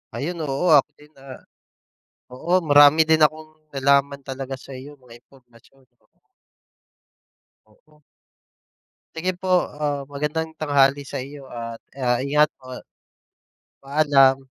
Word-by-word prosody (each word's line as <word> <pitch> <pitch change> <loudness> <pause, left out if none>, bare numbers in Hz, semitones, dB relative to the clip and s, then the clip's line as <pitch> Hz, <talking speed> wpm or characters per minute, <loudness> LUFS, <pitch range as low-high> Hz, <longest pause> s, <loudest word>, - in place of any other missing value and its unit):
Ayun, 165 +2 -4
oo, 140 +5 -2
ako 145 +1 +3
din 150 - -17
na 135 -1 -12 0.9
oo 160 +8 -7
marami 145 0 +6
din 160 -1 +4
akong 155 +1 -4 0.2
nalaman 140 +1 +1
talaga 135 0 -7
sa'yo 135 +2 -10
mga 120 -1 -15
impormasyon 125 0 -24 0.2
oo. - - -37 1.6
Oo. 150 +8 -28 1.1
Sige 180 +3 -1
po, 190 - -5 0.4
ah, 145 -2 -2
magandang 155 +3 -4
tanghali 145 -2 +2
sa 135 - -6
iyo 140 +2 -9
at 115 -1 -8 0.2
ah 125 0 0
ingat 150 +2 +3
po. 130 -1 -10 1.0
Paalam! 135 -2 +3
140 Hz, 115 wpm, -22 LUFS, 135-150 Hz, 1.6 s, marami